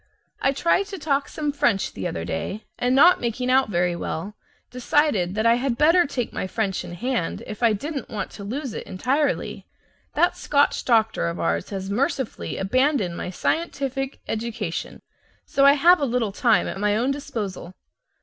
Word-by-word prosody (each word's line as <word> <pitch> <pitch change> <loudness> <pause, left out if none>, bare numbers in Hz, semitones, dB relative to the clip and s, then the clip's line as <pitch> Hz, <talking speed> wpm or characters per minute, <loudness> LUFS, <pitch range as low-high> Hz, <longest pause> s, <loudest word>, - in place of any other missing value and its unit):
I 270 - +3
tried 340 +7 +1
to 400 -2 -6
talk 285 -3 0
some 300 -2 -2
French 280 -9 +1
the 95 - -3
other 80 0 -4
day, 200 - -4
and 250 +1 +2
not 345 +6 +6
making 250 +2 -1
out 260 -2 +4
very 175 -2 +1
well, 170 +3 -4 0.4
decided 245 - +1
that 220 +1 0
I 230 +1 +5
had 250 -1 -1
better 330 +3 +5
take 250 -4 -3
my - - -3
French 195 -1 -2
in 175 - -8
hand 240 -3 -2
if 215 - -8
I 230 -2 +4
didn't 280 +5 -4
want 205 -3 -4
to 200 - -9
lose 255 +4 -4
it - - -6
entirely. 265 +10 -1 0.5
That - - +3
Scotch 285 0 +1
doctor 220 - +2
of 85 +1 -4
ours 85 0 -1
has 195 0 -5
mercifully 260 +2 -2
abandoned 225 - +1
my 180 - -4
scientific 270 - -2
education, 220 -6 -4 0.4
so 275 0 +3
I 280 - +8
have 340 +5 +5
a 285 - +1
little 240 -4 0
time 225 +2 +2
at - - -5
my 205 0 +2
own 250 +4 +1
disposal. 215 -10 -5
240 Hz, 180 wpm, -24 LUFS, 195-280 Hz, 0.5 s, I